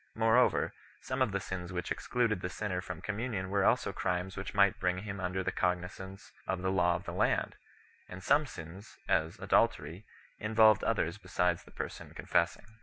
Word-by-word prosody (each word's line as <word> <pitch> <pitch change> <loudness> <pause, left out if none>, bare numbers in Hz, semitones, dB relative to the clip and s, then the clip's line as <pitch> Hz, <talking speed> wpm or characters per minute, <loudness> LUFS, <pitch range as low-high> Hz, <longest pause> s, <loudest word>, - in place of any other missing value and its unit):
Moreover, 110 0 +3 0.3
some 130 0 -3
of 130 -5 +3
the 100 - 0
sins 90 -1 -5
which 90 -1 -4
excluded 115 -6 0
the 90 - -3
sinner 90 -2 -3
from 95 -3 -7
communion 105 -3 -3
were 100 -1 +2
also - - +2
crimes 90 +1 -2
which 100 0 -6
might 100 -1 +4
bring 90 0 +1
him 100 -2 -5
under 95 +1 -2
the - - -1
cognizance 90 +2 -3 0.2
of 95 -1 -2
the 95 - +1
law 90 -2 +3
of 85 - -5
the - - -6
land, - - +1 0.5
and 90 +1 -8
some 150 0 +3
sins, 85 0 -10
as 80 +1 +1
adultery, 85 +7 +1 0.4
involved 110 -1 +5
others 85 +5 0
besides 90 -3 0
the - - -16
person - - -7
confessing. - - 0
95 Hz, 180 wpm, -32 LUFS, 90-105 Hz, 0.5 s, involved